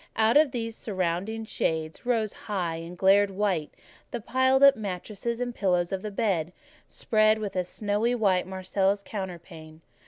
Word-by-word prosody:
Out 220 Hz, +1 st, +3 dB
of 300 Hz, 0 st, +6 dB
these 230 Hz, -3 st, -4 dB
deep -, -, -10 dB
surrounding 195 Hz, +3 st, -2 dB
shades 160 Hz, 0 st, -3 dB
rose 225 Hz, -4 st, +1 dB
high, 180 Hz, -6 st, -3 dB
and 165 Hz, +2 st, -8 dB
glared 195 Hz, +2 st, +4 dB
white, 190 Hz, -6 st, -1 dB, 0.4 s
the 240 Hz, -, -4 dB
piled 260 Hz, +4 st, +2 dB
up 275 Hz, 0 st, +8 dB
mattresses 210 Hz, +3 st, -4 dB
and 245 Hz, -1 st, -2 dB
pillows 180 Hz, -5 st, 0 dB
of 190 Hz, -1 st, -2 dB
the 215 Hz, -, -4 dB
bed, 195 Hz, -6 st, -1 dB, 0.4 s
spread 215 Hz, -1 st, +2 dB
with 205 Hz, -3 st, -5 dB
a 185 Hz, -, +1 dB
snowy 210 Hz, +6 st, -1 dB
Marseilles 190 Hz, -1 st, 0 dB
counterpane. 170 Hz, -5 st, -8 dB
200 Hz, 155 wpm, -27 LUFS, 180-225 Hz, 0.4 s, up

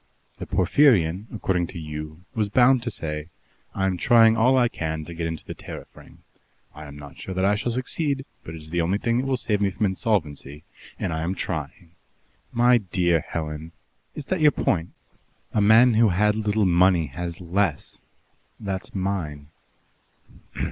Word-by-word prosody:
The -, -, -6 dB
Porphyrion, 95 Hz, -, +3 dB
according 90 Hz, -5 st, -1 dB
to -, -, -9 dB
you, 75 Hz, +1 st, -7 dB
was 110 Hz, -4 st, -1 dB
bound 125 Hz, +3 st, +4 dB
to 120 Hz, -, -3 dB
say, 75 Hz, -6 st, -5 dB, 0.5 s
'I 95 Hz, -, 0 dB
am 95 Hz, -1 st, 0 dB
trying 115 Hz, +4 st, +6 dB
all 125 Hz, +4 st, +4 dB
I 125 Hz, -1 st, +4 dB
can 80 Hz, -7 st, -4 dB
to 85 Hz, -, -8 dB
get 85 Hz, 0 st, -3 dB
into 80 Hz, -1 st, -6 dB
the -, -, -6 dB
Tariff -, -, -10 dB
Ring. -, -, -17 dB, 0.5 s
I 75 Hz, -, -10 dB
am 70 Hz, 0 st, -10 dB
not 75 Hz, -1 st, -12 dB
sure 95 Hz, -, -6 dB
that 95 Hz, +1 st, +1 dB
I 100 Hz, -, +4 dB
shall 105 Hz, +3 st, -1 dB
succeed, 135 Hz, +3 st, -2 dB, 0.2 s
but 80 Hz, -, -8 dB
it 80 Hz, -, -9 dB
is 80 Hz, +1 st, -11 dB
the 85 Hz, 0 st, +1 dB
only 90 Hz, +4 st, +1 dB
thing 115 Hz, +3 st, 0 dB
that 130 Hz, -, -2 dB
will 135 Hz, -1 st, +1 dB
save 105 Hz, -4 st, -1 dB
me 100 Hz, -, +3 dB
from 105 Hz, +3 st, -1 dB
insolvency, 80 Hz, -8 st, -2 dB, 0.3 s
and 90 Hz, -, -2 dB
I 80 Hz, -, -2 dB
am 90 Hz, +4 st, -2 dB
trying.' 80 Hz, +2 st, -5 dB, 0.6 s
My 120 Hz, +1 st, +4 dB
dear 90 Hz, -4 st, +1 dB
Helen 80 Hz, 0 st, -6 dB, 0.2 s
" -, -, -44 dB
"Is 150 Hz, -, -6 dB
that 185 Hz, +1 st, -2 dB
your 150 Hz, -, +7 dB
point? 85 Hz, -, -1 dB, 0.6 s
A 105 Hz, -, +2 dB
man 115 Hz, +4 st, +6 dB
who 110 Hz, 0 st, +4 dB
had 105 Hz, +4 st, +2 dB
little 105 Hz, -1 st, 0 dB
money 90 Hz, -1 st, +4 dB
has 85 Hz, +4 st, -6 dB
less 90 Hz, -3 st, -2 dB, 0.6 s
that's 95 Hz, -2 st, -5 dB
mine." 85 Hz, -7 st, -3 dB
95 Hz, 180 wpm, -24 LUFS, 80-110 Hz, 0.6 s, your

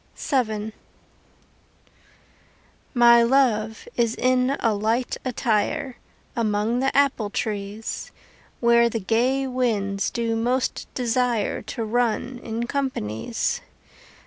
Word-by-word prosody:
VII 220 Hz, -5 st, -1 dB, 2.2 s
My 235 Hz, -1 st, +7 dB
love 230 Hz, -4 st, +2 dB
is 235 Hz, -1 st, +1 dB
in 255 Hz, +2 st, +2 dB
a 225 Hz, -2 st, +2 dB
light 225 Hz, +4 st, 0 dB
attire 245 Hz, +1 st, -1 dB, 0.4 s
Among 220 Hz, +1 st, 0 dB
the 270 Hz, +1 st, +1 dB
apple 270 Hz, -7 st, +2 dB
trees, 210 Hz, 0 st, -4 dB, 0.5 s
Where 235 Hz, 0 st, +5 dB
the 230 Hz, -, -2 dB
gay 245 Hz, +7 st, +1 dB
winds 220 Hz, -6 st, 0 dB
do 230 Hz, -1 st, -1 dB
most 245 Hz, +3 st, -1 dB
desire 245 Hz, -3 st, 0 dB
To 225 Hz, +2 st, -5 dB
run 245 Hz, +2 st, 0 dB
in 230 Hz, +1 st, -3 dB
companies. 240 Hz, -, -2 dB
235 Hz, 95 wpm, -24 LUFS, 215-250 Hz, 2.2 s, My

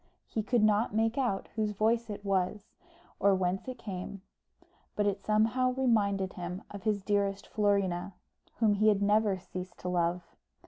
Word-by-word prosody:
He 220 Hz, -, -2 dB
could 230 Hz, +1 st, +1 dB
not 215 Hz, 0 st, +2 dB
make 225 Hz, +1 st, +2 dB
out 245 Hz, -8 st, -1 dB
whose 215 Hz, -2 st, 0 dB
voice 225 Hz, +3 st, +1 dB
it 205 Hz, 0 st, -6 dB
was, 195 Hz, +1 st, -1 dB, 0.5 s
or 200 Hz, -1 st, +4 dB
whence 185 Hz, +2 st, -1 dB
it 255 Hz, -1 st, -5 dB
came, 195 Hz, -2 st, -6 dB, 0.7 s
but 210 Hz, -, +1 dB
it 200 Hz, -1 st, 0 dB
somehow 225 Hz, +4 st, +2 dB
reminded 205 Hz, -7 st, +1 dB
him 180 Hz, +2 st, -6 dB
of 200 Hz, -, -7 dB
his 210 Hz, -2 st, 0 dB
dearest 200 Hz, -1 st, 0 dB
Florina, 200 Hz, -3 st, 0 dB, 0.4 s
whom 220 Hz, -3 st, +3 dB
he 215 Hz, +2 st, +2 dB
had 205 Hz, -2 st, +4 dB
never 205 Hz, -1 st, +3 dB
ceased 185 Hz, 0 st, -8 dB
to 180 Hz, -, -5 dB
love. 175 Hz, 0 st, 0 dB
205 Hz, 165 wpm, -30 LUFS, 190-215 Hz, 0.7 s, or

